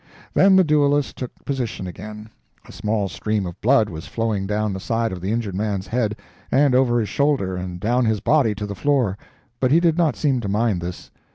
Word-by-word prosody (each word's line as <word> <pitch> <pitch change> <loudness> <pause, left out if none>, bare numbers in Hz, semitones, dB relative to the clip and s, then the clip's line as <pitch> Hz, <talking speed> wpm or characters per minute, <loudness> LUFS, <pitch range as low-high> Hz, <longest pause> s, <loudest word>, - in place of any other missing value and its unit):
Then 195 0 +5
the 190 - +6
duelists 145 -2 +2
took 125 - -5 0.2
position 125 -8 -3
again; 105 +4 -9 0.4
a - - -11
small 105 -1 -1
stream 105 +2 -2
of 85 -1 -8
blood - - +4
was 80 +1 -8
flowing 110 -4 -2
down 105 0 -1
the 95 - -4
side 115 +3 -1
of 90 -1 -6
the 95 +3 -2
injured 115 -4 -2
man's 100 -1 -2
head, 110 -3 -1 0.4
and 140 0 +4
over 125 -2 +3
his 110 - -1
shoulder 140 -11 +1
and 90 -1 -5
down 120 +5 +1
his 110 -2 +1
body 115 -2 +2
to 105 +1 -4
the 100 - -5
floor, 125 -2 +1 0.4
but 130 - +2
he 155 +5 +5
did 170 -1 +2
not 165 -3 +2
seem 140 -4 +1
to 105 -4 -4
mind 105 -3 +1
this. 90 +1 -7
110 Hz, 210 wpm, -22 LUFS, 100-135 Hz, 0.4 s, the